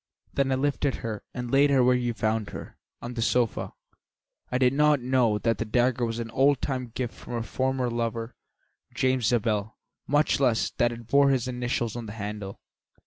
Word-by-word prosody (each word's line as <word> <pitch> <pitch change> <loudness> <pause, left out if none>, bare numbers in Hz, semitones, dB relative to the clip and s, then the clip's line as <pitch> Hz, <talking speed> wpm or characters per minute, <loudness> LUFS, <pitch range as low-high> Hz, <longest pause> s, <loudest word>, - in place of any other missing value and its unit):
Then 135 -1 +1
I - - +3
lifted 140 0 0
her 110 -3 -4
and 125 -1 -5
laid 140 +1 +5
her 135 -2 +4
where 125 +1 +5
you 120 -2 -1
found 110 -1 -1
her, - - -9 0.2
on 120 +1 -5
the 120 - -3
sofa. 120 0 0 0.8
I 125 - +1
did 130 0 +3
not 150 0 +4
know 125 -4 +2
that 115 -1 0
the - - +1
dagger 120 +2 +1
was 115 0 -3
an 115 -1 -5
old 135 +3 +3
time 130 -3 -2
gift 120 +1 -5
of - - -15
her 120 -1 -3
former 130 +1 -1
lover, 115 0 -3 0.6
James 130 -3 +1
Zabel, 110 -2 0 0.3
much 145 +1 +2
less 125 -5 +2
that 120 0 +3
it 120 0 -8
bore 140 +4 +4
his 130 -2 +1
initials 120 -2 -2
on 120 -2 -5
the 105 - -7
handle." 105 -2 -6
120 Hz, 195 wpm, -26 LUFS, 115-130 Hz, 0.8 s, laid